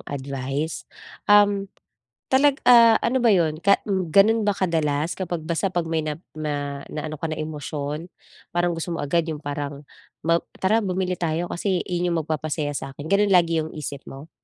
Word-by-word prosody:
advice, 140 +2 -4 0.4
um, 205 -1 +5 0.6
talag 275 +2 +3
ah, 235 -2 +7
ano 255 +3 +1
ba 230 -4 +4
'yon? 155 -3 +1
Ka 200 +3 +3
m 190 -4 -1
gano'n 210 +6 +4
ba 205 - +2
kadalas, 160 -3 0
kapag 175 -3 -3
basta 170 +4 -1
pag 175 -1 +1
may 160 -1 -1
nap 155 +2 -4 0.2
ma 145 -2 -4
naano 155 0 -5
ka 165 - -2
na 155 -1 -4
emosyon? 150 +1 -5 0.5
Parang 175 0 +2
gusto 170 +1 -3
mo 165 - -3
agad 165 +3 +1
'yong 155 -2 -5
parang, 145 0 -5 0.4
"Map 165 +2 +1 0.2
tara 215 +4 +3
bumili 185 -3 -1
tayo, 170 +1 -1
kasi 185 0 -1
iyon 175 -1 -1
yung - - +1
magpapasaya 155 -1 -2
sakin." 140 +4 -8
gano'n 200 -1 +3
lagi 170 -2 +4
'yong 155 0 -4
isip 145 -2 -6
mo? 140 +4 -10
165 Hz, 175 wpm, -23 LUFS, 150-190 Hz, 0.6 s, ah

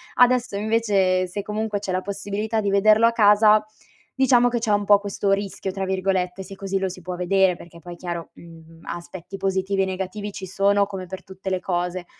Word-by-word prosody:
adesso 250 -3 +3
invece 200 -4 +1
se 200 +3 -5
comunque 210 0 -2
c'è 195 -2 -4
la 185 0 0
possibilità 205 +3 -3
di 200 -2 0
vederlo 215 +3 +5
a 230 - +5
casa, 210 -1 +5 0.5
diciamo 245 -2 +4
che 240 -1 -1
c'è 225 -2 -1
un 205 0 +2
po' 205 0 +6
questo 200 0 -2
"rischio", 195 -1 -2
tra 195 0 -3
virgolette, 190 -1 -1
se 195 - -10
così 195 0 -2
lo 190 0 -1
si 185 0 -10
può 180 +1 -5
vedere, 180 +1 +2
perché 170 0 -14
poi 175 +1 -9
chiaro, 170 -1 -6
mhmm, 165 -1 -15
aspetti 175 +2 -8
positivi 195 0 0
e - - +1
negativi 190 +2 -4
ci 190 - -7
sono 200 +2 +2
come 195 -2 -7
per 190 +1 -8
tutte 190 0 -7
le 185 -1 0
cose. 180 0 -2
195 Hz, 200 wpm, -23 LUFS, 185-205 Hz, 0.5 s, po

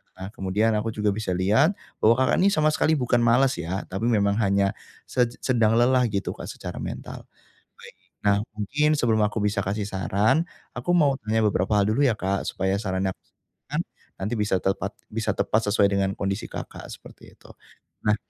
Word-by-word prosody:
Nah 95 +1 -7
kemudian 105 +4 +1
aku 110 0 -4
juga 105 -1 +1
bisa 100 -3 -2
lihat, 110 - +3 0.2
bahwa 115 +2 +5
Kakak 130 0 +2
ini 190 - +4
sama 155 0 +3
sekali 155 +1 +2
bukan 125 -3 +1
malas 120 -1 +3
ya, 90 +4 -3
tapi 105 +5 -1
memang 100 -2 +2
hanya 100 -1 +2 0.3
se 125 -2 +1 0.2
sedang 115 -4 +3
lelah 125 +1 +4
gitu 100 -2 -2
Kak - - -8
secara - - -7
mental. - - -7 0.5
Baik, - - -15 0.3
nah 100 -1 +3 0.2
mungkin 145 +9 +1
sebelum 110 -6 +2
aku 105 +1 -2
bisa 105 -1 0
kasih 100 +1 -2
saran, 105 - +1 0.3
aku 175 +9 0
mau 145 -6 +3
tanya 110 +1 +1
beberapa 95 +2 0
hal 100 - +1
dulu 140 +7 +2
ya 120 - +3
Kak, 100 -1 -2
supaya 95 +1 -1
sarannya 95 -2 -1
yang - - -7
aku - - -47
berikan, - - -7 0.4
nanti 105 +5 -2
bisa 105 -2 +1
tepat 95 +1 -1 0.2
bisa 110 -1 -1
tepat 110 - +1
sesuai 100 -2 +4
dengan 100 -1 0
kondisi 100 +2 -3
Kakak, - - -8
seperti - - -14
itu. - - -19 0.6
Nah, 105 0 +4
105 Hz, 185 wpm, -25 LUFS, 100-120 Hz, 0.6 s, bahwa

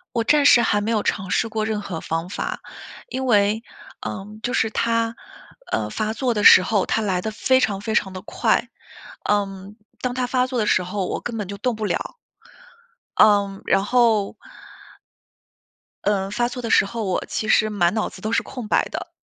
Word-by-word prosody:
我 230 -1 +1
暂 295 +4 +4
时 240 -4 +7
还 205 -2 +2
没 215 - -2
有 220 -2 +1
尝 190 -2 -2
试 230 - +1
过 220 -1 -2
任 215 -1 -2
何 180 -5 -5
方 165 +2 -3
法。 200 - -4 0.5
因 265 - -3
为 215 -1 +3 0.4
嗯， 210 +2 -7
就 245 - -2
是 225 -4 +1
它， 230 0 0 0.6
呃， - - -1
发 215 0 -2
作 245 0 -1
的 210 - -1
时 185 - +9
候， 205 -1 0
它 225 - 0
来 190 -4 0
得 220 +4 -3
非 260 +4 +2
常 200 -5 0
非 220 +1 -3
常 190 -3 +1
地 185 - -8
快。 - - 0 0.6
嗯， 200 -1 -1 0.3
当 250 -1 -1
它 250 0 -1
发 255 0 +1
作 255 -2 -2
的 215 - +1
时 185 - +2
候， 185 +1 -3
我 - - -3
根 235 -2 -5
本 205 - -4
就 200 +1 -6
动 240 +3 -1
不 215 0 -3
了。 345 - -3 1.0
嗯， 200 -2 +3
然 195 0 +2
后 225 -3 +2 1.7
呃， 195 -1 0
发 240 +3 0
作 250 0 -7
的 230 - -4
时 - - +5
候 225 +1 -4
我 185 -2 -1
其 215 - -3
实 215 - +4
满 180 -4 +2
脑 220 - 0
子 - - -13
都 215 +3 -3
是 230 - +2
空 245 -5 -8
白 - - +3
的。 - - -5
215 Hz, 215 characters per minute, -22 LUFS, 200-230 Hz, 1.7 s, 时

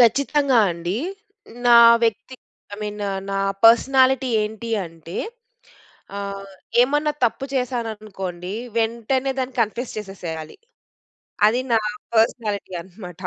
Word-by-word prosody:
ఖచ్చితంగా 275 +2 +3
అండి. 175 +3 -3 0.7
నా 240 -1 +8 0.3
వ్యక్తి 230 +3 -2 0.4
ఐ - - -10
మీన్ 210 0 -5 0.6
పర్స్‌నాలిటీ 260 +2 +5
ఏంటి 220 +2 -5 0.2
అంటే, 165 +1 -11 1.0
ఆహ్, 200 0 -6 0.3
ఏమన్నా 295 +4 +1
తప్పు 240 +3 0
చేశాననుకోండి. 215 -8 -4 0.3
వెంటనే 235 +4 0
దాన్ని 260 -1 -3
కన్ఫెస్ 235 +3 -2
చేసేసేయాలి. 170 -6 -7 0.9
అది 235 +4 +2
నా 225 - +5 0.4
పర్స్‌నాలిటీ 220 -3 0
అన్నమాట. 180 0 -11
225 Hz, 95 wpm, -22 LUFS, 195-250 Hz, 1.0 s, నా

